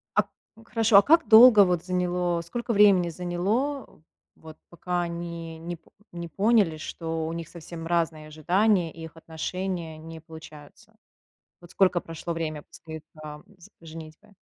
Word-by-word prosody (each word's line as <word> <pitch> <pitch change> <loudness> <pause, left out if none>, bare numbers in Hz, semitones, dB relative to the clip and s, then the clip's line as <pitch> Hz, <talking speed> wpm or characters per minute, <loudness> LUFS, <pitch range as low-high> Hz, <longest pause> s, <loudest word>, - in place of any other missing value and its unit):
А, - - +5
п - - -29 0.4
Хорошо, 225 -3 +3
а 200 - +9
как 330 +5 +3
долго 220 -2 +9
вот 175 -2 -1
заняло, 180 -1 -1
сколько 235 +7 -4
времени 195 -4 +5
заняло, 190 - -3 0.3
вот 160 -1 -14
пока 175 +1 -3
они 170 -1 -6
не 175 +1 -6
по 165 - -25 0.2
не 170 0 -6
поняли, 200 -3 +2
что 160 0 -5
у 165 - -4
них 165 -1 -7
совсем 165 -1 -9
разные 165 -2 -1
ожидания, 175 +3 +1
и 165 - -11
их 160 0 -11
отношения 165 +1 -5
не 160 +1 -10
получаются? 160 +5 -14 0.7
Вот 175 - -16
сколько 185 -2 +2
прошло 165 +1 -6
время 155 -3 -4
после, 160 -1 -11 0.2
там, 150 -1 -10
с 175 - -16
женитьбы? 165 +5 -12
170 Hz, 155 wpm, -26 LUFS, 160-190 Hz, 0.7 s, а